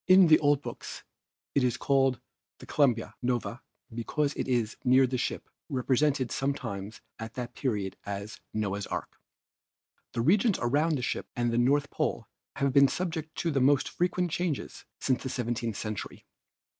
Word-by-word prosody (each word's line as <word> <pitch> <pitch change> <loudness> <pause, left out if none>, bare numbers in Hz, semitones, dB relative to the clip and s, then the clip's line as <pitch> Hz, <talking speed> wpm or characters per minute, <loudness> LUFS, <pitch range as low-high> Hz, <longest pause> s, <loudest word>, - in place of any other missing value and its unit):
the 185 -4 +8
old 145 -1 +3
books - - -7 0.5
it 140 - +3
is 125 -2 +1
called 135 -3 +2 0.5
Columba 120 -7 +2
Noae 120 0 -1 0.3
because 140 +5 -1
it - - -3
is 120 -4 0
near 130 +1 +6
the 130 0 -2
ship, - - -3 0.2
represented 135 0 +1
sometimes 115 -7 -3 0.2
at 110 0 -7
that 125 -2 -5
period 105 -8 -2
as 100 +1 -6
Noah's 100 -2 -2
Ark. - - -5 0.9
The 115 - 0
regions 195 - +4
around 150 +6 +2
the 125 - -3
Ship - - -2
and 120 -1 +1
the 115 - +2
North 140 +4 +2
Pole - - -1 0.3
have 140 -1 +1
been 140 0 +7
subject 160 -1 -3
to 170 - -1
the 135 -3 +1
most 140 +1 +4
frequent 180 0 0
changes 175 -4 -3
since 130 -2 +1
the 130 - -4
seventeenth 120 -3 -2
century. 110 -2 -5
130 Hz, 155 wpm, -29 LUFS, 115-145 Hz, 0.9 s, the